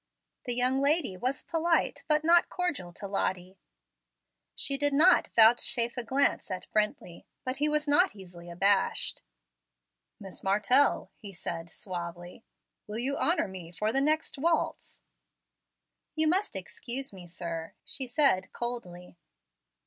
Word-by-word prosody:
The 245 -2 -1
young 255 +2 +2
lady 285 - +1
was 255 +8 -3
polite, 335 0 0
but 305 0 +2
not 340 +2 +4
cordial, 340 - -3
to 200 - -7
Lottie; 185 -1 -3 1.0
she 275 - 0
did 290 +1 +1
not 340 +6 +5
vouchsafe 235 +1 +5
a 245 - -3
glance 270 +4 +1
to 185 -1 -4 0.2
Brently. 210 -5 -2 0.2
But 255 +1 -3
he 300 +1 +1
was 300 0 0
not 350 - +3
easily 175 -3 -12
abashed. 195 +3 +1 1.0
"Miss 195 -3 -6
Martell," 210 +8 +3
he 205 -3 -9
said 170 -2 -6
suavely, 175 +1 -8 0.4
"will 210 +1 -5
you 265 +4 -1
honor 340 - +2
me 180 -3 -10
for 210 +5 -2
the 270 - +2
next 310 0 0
waltz?" 330 +3 -1 1.1
"You 315 0 +1
must 375 - 0
excuse 240 +7 -4
me, 180 -2 -12
sir," 165 -1 -6
she 265 - -1
said 245 -6 +2
coldly. 180 -8 -6
235 Hz, 135 wpm, -28 LUFS, 185-285 Hz, 1.1 s, not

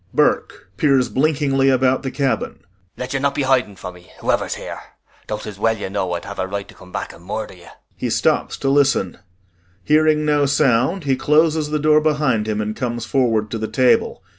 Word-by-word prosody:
] - - -31
BURKE - - +1
[Peers 135 -4 +3
blinkingly 135 -2 +2
about 130 0 +2
the 135 - -3
cabin 135 0 -1
hoarsely.] - - -30 0.3
Let 125 +1 -5
you 135 - 0
not 140 0 0
be 145 - 0
hiding 130 -6 +1
from 90 -1 -8
me, 90 0 -17
whoever's - - 0
here - - -7 0.5
though 105 - -3
'tis 105 -2 -9
well 115 +1 +1
you 100 -2 -5
know 95 -3 -2
I'd 85 - -4
have 100 - -8
a 95 - -1
right 100 +1 -5
to - - -13
come 90 - -16
back - - -5
and 85 - -16
murder 105 +3 -5
you. 85 -2 -16 0.3
[He - - -3
stops - - 0
to 135 - -1
listen. 135 -11 +2 0.6
Hearing 155 0 +3
no 145 -1 +2
sound, 140 +5 +2
he 135 -2 +1
closes 155 +2 +2
the 150 - 0
door 150 0 +4
behind 145 -8 +1
him 110 -1 -1
and 105 0 -3
comes 120 -2 -3
forward 115 -5 +1
to 115 - -3
the 110 - -2
table. 130 +1 +2
130 Hz, 215 wpm, -20 LUFS, 105-145 Hz, 0.6 s, door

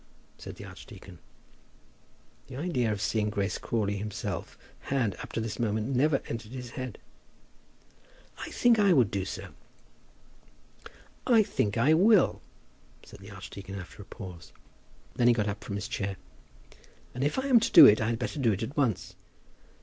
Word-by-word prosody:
said - - -9
the - - -10
archdeacon. - - -12 1.3
The 130 - -9
idea 130 -7 -1
of 105 - -3
seeing 105 0 0
Grace 100 -1 -2
Crawley 100 -3 -1
himself 105 +1 -5 0.2
had, 125 -7 -1
up - - -8
to - - -1
this 110 -2 -4
moment, 110 +3 -1
never 140 +2 +2
entered 115 0 -6
his 125 -2 -7
head. 130 -3 -6 1.4
"I - - -6
think 240 -2 +3
I 200 -3 +5
would 125 - +3
do 95 -2 -2
so." - - -7 1.7
"I 230 -3 +6
think 105 - -1
I 140 +7 +4
will," 195 +4 +4 0.6
said - - -14
the 100 +1 -12
archdeacon, 100 0 -9
after 95 +1 -9
a - - -11
pause. 90 -6 -10 0.7
Then 120 - +3
he 120 - +6
got 105 -2 0
up 100 0 -4
from 100 - -5
his 105 +2 -4
chair. 100 -5 -3 1.0
"If 135 - -1
I 265 - -1
am 255 -4 +6
to 225 - -1
do 160 - +11
it, 105 -3 +6
I 110 - 0
had 115 - -1
better 150 - -4
do 120 -5 +3
it 100 +1 -2
at 120 +6 -6
once." 125 -9 0
115 Hz, 165 wpm, -28 LUFS, 100-140 Hz, 1.7 s, do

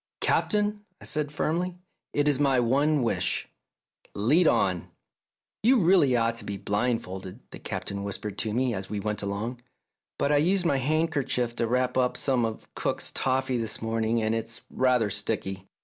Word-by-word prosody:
" - - -66
Captain," 210 -1 +1 0.2
I - - -12
said 150 -1 -2
firmly, 170 +4 -1 0.2
" - - -54
it 145 0 +2
is 145 -2 +3
my 135 -3 +3
one 140 +4 +2
wish. 115 - 0 0.7
Lead 150 - +4
on! 90 -3 +1 0.4
" - - -66
"You 245 +3 +5
ought - - +2
really 170 -8 +5 0.2
to 115 -1 -8
be 100 -1 -4
blindfolded," 100 -4 -2
the - - -9
Captain 100 0 -4
whispered 100 0 -4
to 110 - 0
me 125 +2 +1
as 95 -2 -5
we 105 0 -2
went 105 0 -2
along, 105 +5 -3 0.3
" - - -63
but 140 - +1
I 145 - +5
used 180 +5 +3
my 145 -5 +3
handkerchief 140 -4 0
to 115 - +1
wrap 125 +2 +1
up 125 -1 +1
some 130 -4 +1
of 110 -1 -5
cook's - - -2
toffee 130 -1 0
this 110 -2 -2
morning, 115 0 0
and 110 +1 +1
it's 115 0 -3
rather 125 -5 +2
sticky." 95 0 -3
125 Hz, 180 wpm, -27 LUFS, 110-145 Hz, 0.7 s, You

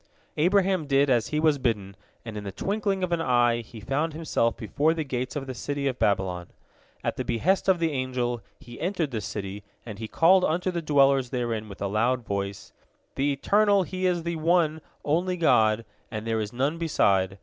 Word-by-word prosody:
Abraham 185 -1 +2
did 140 0 +3
as 120 -3 +2
he 150 - -1
was 155 -2 +3
bidden, 105 -6 -1 0.3
and 110 -2 -7
in 105 - -5
the 100 - -5
twinkling 200 - -1
of 180 - -1
an 170 -1 +1
eye 120 -4 +3
he 115 0 -12
found 150 +8 -1
himself 150 -7 0
before 145 - 0
the 160 - -1
gates 130 -1 -4
of 140 -2 -3
the 130 - -5
city 140 +3 -3
of 130 -2 -1
Babylon. 90 -3 0 0.6
At - - -2
the - - -1
behest 185 - +1
of 190 - +5
the 165 -1 0
angel, 125 -3 -2 0.2
he 120 0 -12
entered 175 -5 -1
the 110 -3 -3
city, 100 0 -5 0.2
and 110 -3 -8
he 110 - -4
called 180 - +4
unto 180 +3 0
the 170 -1 -3
dwellers 140 -4 +3
therein 115 -4 -3
with 100 0 -7
a - - 0
loud 115 +4 0
voice: 100 -1 -4 0.4
"The 140 +2 0
Eternal, 200 +7 +3
He 185 +1 -2
is 175 -2 0
the 170 0 -2
One 160 -1 +2 0.2
Only 180 +5 +1
God, 110 -9 +3 0.2
and 110 -1 -5
there 115 -1 0
is 105 0 -4
none 140 +7 -1
beside. 95 - +2
135 Hz, 200 wpm, -26 LUFS, 110-165 Hz, 0.6 s, of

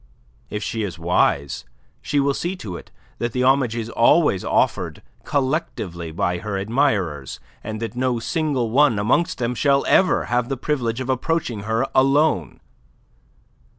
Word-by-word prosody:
If 105 - -4
she 115 - -3
is 95 -5 -4
wise 80 -4 +1 0.4
she 145 - 0
will 140 0 +2
see 175 +6 -3
to 100 - -7
it - - -10 0.3
that 120 -1 -2
the 125 - 0
homage 130 -3 +3
is 115 -2 -3
always 115 - +3
offered - - 0 0.2
collectively 130 - -2
by 90 0 -1
her 100 +2 -3
admirers, 100 - 0 0.2
and 110 0 -5
that 115 - -5
no 125 -1 0
single 135 -3 -1
one 140 -3 +4
amongst 120 +12 +1
them 120 0 -1
shall 140 +2 +2
ever 185 -3 +3
have 125 0 0
the 135 - -2
privilege 125 -3 -1
of 130 - -5
approaching 125 -6 -2
her 115 +4 +1
alone. 135 - +2
120 Hz, 150 wpm, -22 LUFS, 105-140 Hz, 0.4 s, one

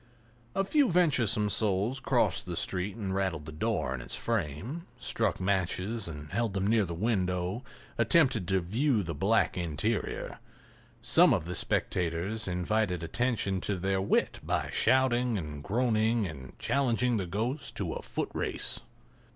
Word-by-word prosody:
A 195 - +2
few 280 +5 +3
venturesome 125 - +2
souls 105 +6 +1
crossed - - +1
the - - -3
street 95 +2 -2
and 100 -4 -3
rattled 95 -6 -1
the 80 - -7
door 80 - -1
in 65 - -4
its - - -5
frame; 115 - -3
struck 125 - -1
matches 95 +3 -1
and 75 -2 -8
held 110 0 -1
them 95 0 0
near 110 0 +3
the 85 -1 -5
window; 90 +1 -1 0.4
attempted 120 - +3
to 95 0 +2
view 110 - +1
the 80 -1 -4
black 100 +9 +2
interior. 85 +7 -2 0.6
Some - - +6
of - - -3
the 90 - -4
spectators 90 +5 -1
invited 90 0 0
attention 100 -1 0
to 100 0 -1
their 95 +1 0
wit 95 - +1
by - - -1
shouting 125 -3 +3
and 75 -5 -6
groaning 110 0 +2
and 65 -7 -8
challenging 125 -3 +1
the 95 -3 -2
ghost 115 - -3
to 90 -5 -2
a - - -5
footrace. - - -2
100 Hz, 150 wpm, -30 LUFS, 90-115 Hz, 0.6 s, Some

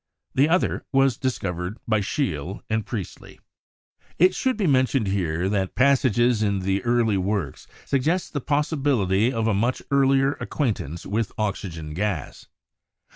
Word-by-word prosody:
The 140 +4 +3
other 180 +3 +1
was 135 -2 +3
discovered 95 -6 -3
by 110 -2 +2
Scheele 95 - -3
and 110 -1 0
Priestley. 100 -7 -7 0.8
It 185 +2 +5
should 260 +1 0
be 210 - 0
mentioned 130 -4 +2
here 90 -3 -1
that 95 -2 -1
passages 125 -4 +3
in 100 -3 0 0.2
early 120 -3 +2
works 95 -6 -2 0.2
suggest 160 +7 0
the 145 - -2
possibility 135 - +1
of 115 -3 -1
a 110 - +2
much 115 +6 0
earlier 135 0 +3
acquaint 130 -8 -1
ance 80 +5 -7
with 110 +1 -1
oxygen 90 -7 -3
gas. 95 -4 -3
110 Hz, 135 wpm, -24 LUFS, 95-135 Hz, 0.8 s, It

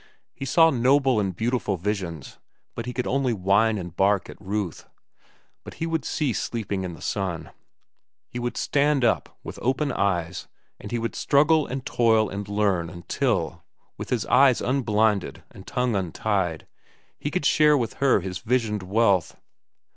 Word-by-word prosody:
He 135 - -6
saw 165 +4 +5
noble 130 0 +3
and 95 -3 -1
beautiful 115 -1 -1
visions, 90 -5 -4 0.3
but 115 0 -6
he - - -2
could 125 0 -3
only 135 -2 0
whine 105 +3 +2
and 90 -3 -7
bark 100 0 +1
at - - -16
Ruth. 100 -3 -4 0.8
But - - -10
he 165 - -3
would 160 -4 -2
cease 145 -7 -1
sleeping 100 -5 -3
in 90 -2 -5
the - - -13
sun. 95 -5 -3 0.8
He 120 - -6
would 120 0 -3
stand 145 -2 +2
up, 115 - 0
with - - -8
open 135 +3 0
eyes, 90 -5 -1 0.3
and - - -9
he 120 - 0
would 115 0 -3
struggle 150 +2 +3
and 130 0 -5
toil 110 -3 +2
and 100 0 -5
learn 100 -5 0
until, 85 -1 -2 0.3
with - - -8
eyes 130 -1 +5
unblinded 110 -6 0
and 95 - -14
tongue 125 -2 0
untied, 95 -2 -1 0.5
he 145 - -3
could 165 -1 -2
share 150 +1 +5
with 115 -4 -2
her 135 -7 +4
his 90 0 -5
visioned 115 -3 0
wealth. 100 -2 +1
110 Hz, 160 wpm, -25 LUFS, 95-130 Hz, 0.8 s, saw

